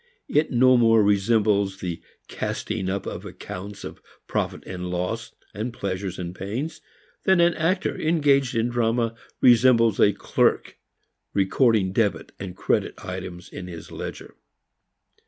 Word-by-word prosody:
It 155 - +2
no 130 0 +5
more 115 -2 +5
resembles 100 -1 +2
the 85 -3 -4 0.3
casting 105 -3 -3
up 100 0 -2
of - - -5
accounts 100 +3 -8
of - - -8 0.2
profit - - -2
and 90 -1 -5
loss, 90 +7 -3 0.4
pleasures 95 -3 -4
and 90 -1 -5
pains, 115 - -5 0.4
than 190 -1 +4
an 170 0 +5
actor 185 +5 0
engaged 145 -5 +2
in 115 +1 +1
drama 115 -1 +1 0.3
resembles 115 -3 +5
a 105 - +6
clerk - - 0 0.6
recording 100 0 +3
debit 100 -6 0
and 95 -2 -7
credit - - 0
items 90 0 -6
in 90 - -8
his 85 -3 -9
ledger. - - -7
110 Hz, 130 wpm, -24 LUFS, 95-125 Hz, 0.6 s, a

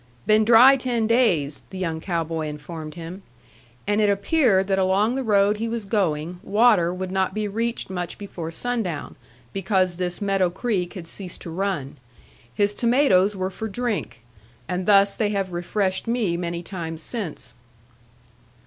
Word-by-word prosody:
"Been 215 0 +4
dry 245 +4 +8
ten 245 -3 -1
days," 185 - +2
the 190 - -8
young 165 -3 -2
cow 170 -2 -1
boy 160 -1 -3
informed 155 +1 -7
him. 170 +3 -8 0.6
And 205 +1 +1
it 210 - +3
appeared 200 -1 +3
that 195 0 +1
along 195 +5 +2
the 270 - -1
road 205 -3 +3
he 225 +2 -2
was 230 -2 -3
going, 175 -4 -1
water 205 -5 +3
would 185 0 -4
not 190 +1 0
be 215 -1 -1
reached 230 +3 -2
much 180 -2 -5
before 180 -5 -6
sundown, 190 -2 -3 0.4
because 190 -2 0
this 180 -1 -2
Meadow 195 -3 +1
Creek 185 -2 -2
had 180 -3 -7
ceased 180 +2 -7
to 170 - -7
run. 170 -6 -3 0.5
His 205 +9 +1
tomatoes 230 -5 +3
were 185 0 -2
for 220 +4 -5
drink. 220 - -3 0.4
And 180 0 -3
thus 200 -1 +5
they 215 -2 0
have 195 -2 -2
refreshed 185 +3 -1
me 230 -7 0
many 170 0 -3
times 165 -4 -6
since. 210 -10 -4
195 Hz, 160 wpm, -23 LUFS, 175-215 Hz, 0.6 s, dry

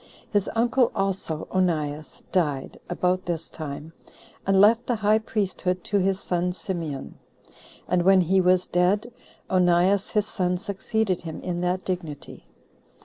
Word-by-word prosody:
His 205 -2 +1
uncle 240 +2 +3
also, 195 -5 -2
Onias, 155 -5 -1
died 150 -8 -1
[about 185 +1 0
this 165 -2 -3
time], 155 +1 -7 0.5
and 195 0 +4
left 225 +4 +5
the 245 - +1
high 215 0 +3
priesthood 190 -4 -2
to 205 - +1
his 190 0 +1
son 180 -1 -1
Simeon. 165 -7 -5 0.7
And 180 0 +2
when 190 +1 +5
he 190 +2 +3
was 180 0 +3
dead, 200 +7 +1 0.3
Onias 185 +2 +3
his 210 -2 +1
son 180 -3 -1
succeeded 200 0 -1
him 160 -2 -6
in 175 -1 -3
that 180 +1 -1
dignity. 170 -6 -5
185 Hz, 140 wpm, -25 LUFS, 175-200 Hz, 0.7 s, left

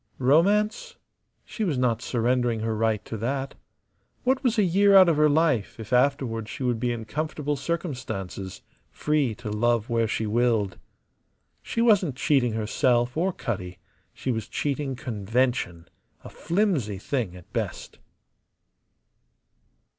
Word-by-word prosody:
Romance? 210 - +2 0.5
She 220 - -4
was 165 -9 0
not 125 -3 +1
surrendering 120 -1 0
her 110 0 -1
right 110 -1 0
to - - -6
that. 135 +5 -2 0.7
What 260 +2 +1
was 240 -3 +1
a 210 - +4
year 195 +2 +4
out 190 -1 +9
of 165 -3 +2
her 150 0 +5
life 150 -9 +1
if 110 +2 -6
afterward 125 -4 +1
she 140 -1 -6
would 120 -2 0
be 120 +1 0
in 115 -2 -4
comfortable 150 +2 -2
circumstances, 125 - -5 0.3
free 150 -7 0
to 115 -2 -6
love 120 +2 +1
where 115 -1 +2
she 110 0 -2
willed? 110 -2 +1 0.8
She 230 - -2
wasn't 195 - +3
cheating 130 -4 +2
herself 120 +3 +1
or 180 +4 +1
Cutty: 95 - -5 0.3
she 130 - -3
was 110 -3 -3
cheating 140 -2 -2
convention, 115 -6 -1 0.4
a - - -9
flimsy 165 - 0
thing 105 -3 -3
at 90 -1 -15
best. - - -4
125 Hz, 140 wpm, -25 LUFS, 110-155 Hz, 0.8 s, out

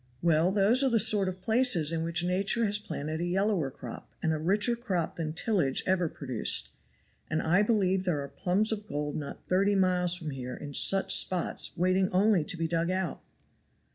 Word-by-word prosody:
"Well, 170 +1 +3
those 210 +6 +3
are 270 - +3
the 235 - +2
sort 210 -3 +4
of 185 0 -9
places 220 - +3
in 165 -1 -2
which 165 0 0
nature 195 +6 +1
has 205 0 0
planted 155 -4 -5
a - - -1
yellower 185 -4 0
crop 125 -4 -10
and 160 - +1
a 155 - -3
richer 205 +8 +1
crop 195 -9 -3
than 160 -2 -3
tillage 165 - 0
ever 180 -3 +1
produced. 130 -8 -1 0.6
And 155 - -1
I 175 +5 +2
believe 195 -4 +1
there 160 -6 -1
are - - -7
plums 190 +9 0
of 210 -1 -4
gold 145 -5 -4
not 145 -2 -7
thirty 195 +2 +1
miles 180 -2 +1
from 160 -4 -6
here 125 -2 -6
in 145 -1 -9
such 195 +7 +4
spots 180 0 0
waiting 185 +2 +1
only 195 -2 +2
to 175 - -2
be 165 0 -1
dug 165 +1 -1
out." 185 -1 -3
180 Hz, 195 wpm, -28 LUFS, 160-200 Hz, 0.6 s, sort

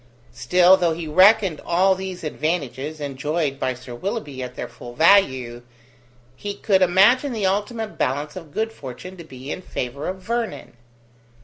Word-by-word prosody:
Still, 180 +1 +5
though 175 -3 +1
he 165 -1 -6
reckoned 190 +1 +5
all 185 +3 +3
these 190 -2 -6
advantages 155 -2 -3
enjoyed 145 +1 -2
by 130 - -1
Sir 125 0 -10
Willoughby 150 - -4
at 125 0 -6
their - - -5
full 120 0 -11
value, 130 -9 +3 0.7
he 205 +8 -5
could 195 -2 +2
imagine 220 +10 +4
the 215 -4 -1
ultimate 210 +3 -2
balance 145 +3 -1
of 165 -5 -9
good 220 +7 -2
fortune 140 - -9
to 170 - -9
be 130 -2 -9
in - - -5
favour 140 -4 -5
of 185 - -2
Vernon. 230 - -4
170 Hz, 155 wpm, -22 LUFS, 135-195 Hz, 0.7 s, Still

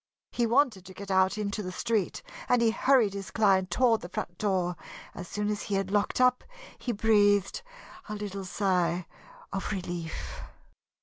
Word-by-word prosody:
He 240 -1 +1
wanted 235 -5 +2
to 190 -1 -11
get 200 0 -7
out 190 +2 +3
into 210 0 -2
the 185 -2 -5
street 210 0 -1 0.3
and 245 - +5
he 230 -1 +4
hurried 245 -4 +3
his 200 -1 -6
client 195 -4 +3
toward 230 +4 +3
the 175 - -8
front 175 -1 -5
door. 185 -4 0 0.4
As 180 - -7
soon 210 +3 -2
as 210 0 -1
he 205 - -2
had 195 -1 -1
locked 205 +3 +1
up, 250 0 +4 0.4
he 245 - -2
breathed 205 - +3 0.5
a 210 - -3
little 200 -2 -5
sigh 180 -2 0 0.5
of 195 - -2
relief. 175 -4 -5
200 Hz, 170 wpm, -29 LUFS, 185-220 Hz, 0.5 s, and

